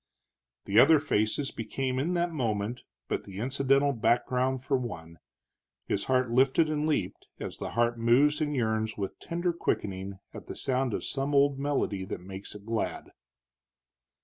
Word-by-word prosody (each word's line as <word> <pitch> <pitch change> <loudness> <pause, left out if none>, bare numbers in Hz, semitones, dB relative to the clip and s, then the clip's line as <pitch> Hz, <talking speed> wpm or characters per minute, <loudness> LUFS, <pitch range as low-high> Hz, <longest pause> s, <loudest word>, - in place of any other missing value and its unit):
The 100 +3 +4
other 155 +5 +8
faces 135 -1 0
became 130 +3 -2
in 170 +6 0
that 175 0 +1
moment 115 -5 -2 0.3
but - - -2
the 95 -2 -10
incidental 135 +4 +2
background 125 +2 +1
for 140 0 +1
one; 85 -10 -5 0.7
his 100 - -1
heart 130 -2 +1
lifted 135 +6 +3
and 150 0 0
leaped 155 - -2
as - - -5
the - - -5
heart 120 0 +2
moves 135 +7 +4
and 150 -1 0
yearns 110 -3 0
with 100 -2 -4
tender 175 +1 -1
quickening 95 - -2 0.2
at - - -10
the - - -6
sound 130 -3 0
of - - -4
some 140 +1 -1
old 140 0 +4
melody 140 -9 -1
that - - -5
makes 95 +2 -8
it 105 0 -11
glad. 115 0 -3
130 Hz, 160 wpm, -29 LUFS, 110-140 Hz, 0.7 s, other